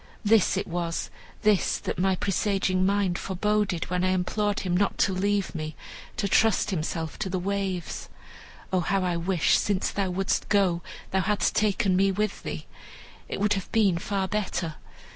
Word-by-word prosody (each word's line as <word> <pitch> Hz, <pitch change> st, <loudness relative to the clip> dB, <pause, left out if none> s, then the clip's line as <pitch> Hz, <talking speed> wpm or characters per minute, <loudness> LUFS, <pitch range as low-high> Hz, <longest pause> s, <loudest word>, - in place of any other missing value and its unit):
"This 210 Hz, -3 st, +4 dB
it 200 Hz, -, -1 dB
was, 170 Hz, -1 st, -3 dB, 0.3 s
this 210 Hz, -3 st, +3 dB
that -, -, -4 dB
my 190 Hz, +1 st, +3 dB
presaging 190 Hz, -1 st, +1 dB
mind 195 Hz, -3 st, +1 dB
foreboded, 200 Hz, -2 st, 0 dB
when 180 Hz, 0 st, +1 dB
I 185 Hz, -, +3 dB
implored 200 Hz, +3 st, 0 dB
him 180 Hz, -2 st, -1 dB
not 200 Hz, +2 st, +1 dB
to 190 Hz, -, +2 dB
leave 200 Hz, +1 st, 0 dB
me, 155 Hz, -2 st, -5 dB, 0.4 s
to 210 Hz, -4 st, 0 dB
trust 215 Hz, 0 st, +3 dB
himself 160 Hz, -2 st, -3 dB
to 205 Hz, -3 st, -2 dB
the 185 Hz, -, -1 dB
waves. 190 Hz, -2 st, -3 dB, 0.6 s
Oh, 185 Hz, -, +4 dB
how 190 Hz, +2 st, 0 dB
I 180 Hz, -1 st, 0 dB
wish, 170 Hz, 0 st, +2 dB
since 200 Hz, -2 st, 0 dB
thou 195 Hz, -2 st, -1 dB
wouldst 190 Hz, +2 st, -1 dB
go, 190 Hz, -4 st, +3 dB, 0.3 s
thou 190 Hz, -, +2 dB
hadst 210 Hz, +2 st, +1 dB
taken 200 Hz, -2 st, +2 dB
me 195 Hz, +1 st, +3 dB
with 210 Hz, +1 st, -1 dB
thee! -, -, -5 dB, 0.6 s
It -, -, -3 dB
would 205 Hz, +1 st, +3 dB
have 195 Hz, -2 st, -4 dB
been 200 Hz, -6 st, +3 dB
far 195 Hz, +1 st, -1 dB
better. 185 Hz, -6 st, -2 dB
190 Hz, 170 wpm, -26 LUFS, 180-205 Hz, 0.6 s, This